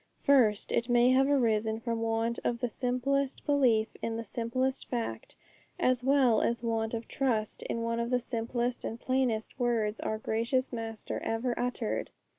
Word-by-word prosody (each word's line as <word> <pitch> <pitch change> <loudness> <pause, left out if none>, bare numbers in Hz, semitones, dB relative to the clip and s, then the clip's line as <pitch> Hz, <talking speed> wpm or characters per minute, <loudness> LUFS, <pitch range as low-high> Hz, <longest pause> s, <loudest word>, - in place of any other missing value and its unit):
First, 235 -7 +4
it 235 - 0
may 240 +1 +5
have 265 +1 +4
arisen 220 -5 +2
from 230 -1 -2
want 225 +1 0
of 240 - 0
the 245 - -1
simplest 260 +3 -1
belief 250 -7 +3
in 225 0 -2
the 230 - -3
simplest 245 +4 -2
fact, 235 -2 -4 0.4
as 250 -1 +2
well 265 -4 +4
as 235 0 0
want 225 0 -1
of 225 0 -5
trust 230 -6 -1
in 230 - -3
one 230 0 -1
of 235 0 -1
the 250 0 +2
simplest 240 0 -2
and 230 - -4
plainest 255 -3 -1
words 225 -3 0
our 220 - -2
gracious 235 +5 -1
Master 225 -1 -4
ever 235 +2 -1
uttered! 245 -2 -2
235 Hz, 165 wpm, -30 LUFS, 225-255 Hz, 0.4 s, may